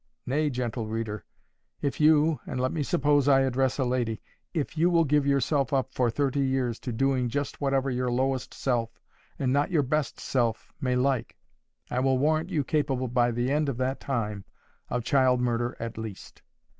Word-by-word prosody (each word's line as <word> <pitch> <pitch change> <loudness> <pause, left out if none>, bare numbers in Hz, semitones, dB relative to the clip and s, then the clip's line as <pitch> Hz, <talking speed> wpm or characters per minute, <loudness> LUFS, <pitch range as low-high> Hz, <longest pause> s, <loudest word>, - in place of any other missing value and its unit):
Nay, 150 +4 +1
gentle 120 -3 -3
reader, 110 -3 -4 0.6
if 140 -3 -1
you—and 150 -3 +3
let 130 +1 +1
me 160 - -2
suppose 145 0 +2
I 135 -1 +6
address 130 0 +1
a 135 - +1
lady—if 125 - -3
you 165 +3 +3
will 170 -2 +4
give 145 -1 +2
yourself 140 -1 +1
up 130 -1 0
for 125 -2 +2
thirty 140 +3 0
years 130 -3 0
to 125 - -5
doing 130 +1 +1
just 145 +4 -3
whatever 135 -1 +1
your 125 0 -1
lowest 130 +1 0
self 120 -3 -2 0.4
and 130 -1 0
not 145 +4 +2
your 160 -6 +2
best 150 +2 -1
self 120 -4 -1
may 125 -2 +1
like, 130 -1 0 0.5
I 125 - 0
will 130 0 +2
warrant 155 +4 +1
you 150 - 0
capable, 135 -3 0
by 120 0 +2
the 120 +2 -1
end 150 0 +1
of 130 - -3
that 130 +1 -1
time, 105 -7 -3 0.5
of 125 -1 -1
child 130 -1 +3
murder 120 0 -1
at 115 -1 -5
least. 110 -3 -8
130 Hz, 180 wpm, -27 LUFS, 120-140 Hz, 0.6 s, I